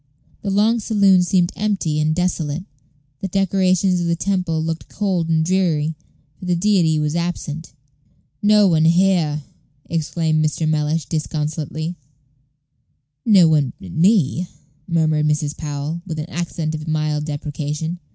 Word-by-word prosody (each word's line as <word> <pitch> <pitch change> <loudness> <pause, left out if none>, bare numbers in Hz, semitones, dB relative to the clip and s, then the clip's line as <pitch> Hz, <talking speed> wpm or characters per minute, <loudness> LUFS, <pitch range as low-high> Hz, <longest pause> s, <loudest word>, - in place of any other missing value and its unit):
The 200 - -3
long 215 +4 +3
saloon 200 -4 +4
seemed 180 0 +2
empty 195 -7 -1
and 155 +1 +1
desolate. 175 -2 -1 0.6
The 195 - -3
decorations 190 -1 +2
of 170 - -1
the 170 - +1
temple 180 -3 -1
looked 165 0 -4
cold 185 -5 -1
and 160 -1 +2
dreary, 165 -4 +1 0.5
for - - -8
the 180 -1 +1
deity 175 -4 +2
was 150 +1 -1
absent. 165 -3 -4 0.7
"No 210 -1 +5
one 160 -3 +3
here!" 170 -4 +2 0.4
exclaimed 160 -1 0
Mr. 155 +1 0
Mellish, 155 +1 0
disconsolately. 155 +1 -3 1.3
"No 195 -6 +7
one 150 -5 +2
but 90 - -10
me," 180 - +2 0.4
murmured 155 -3 +2
Mrs. 150 -1 0
Powell, 150 +2 -4
with 160 -3 -4
an 155 +4 -5
accent 165 -2 -3
of 155 0 -6
mild 155 -1 -1
deprecation. 150 +2 -4
165 Hz, 135 wpm, -20 LUFS, 155-185 Hz, 1.3 s, No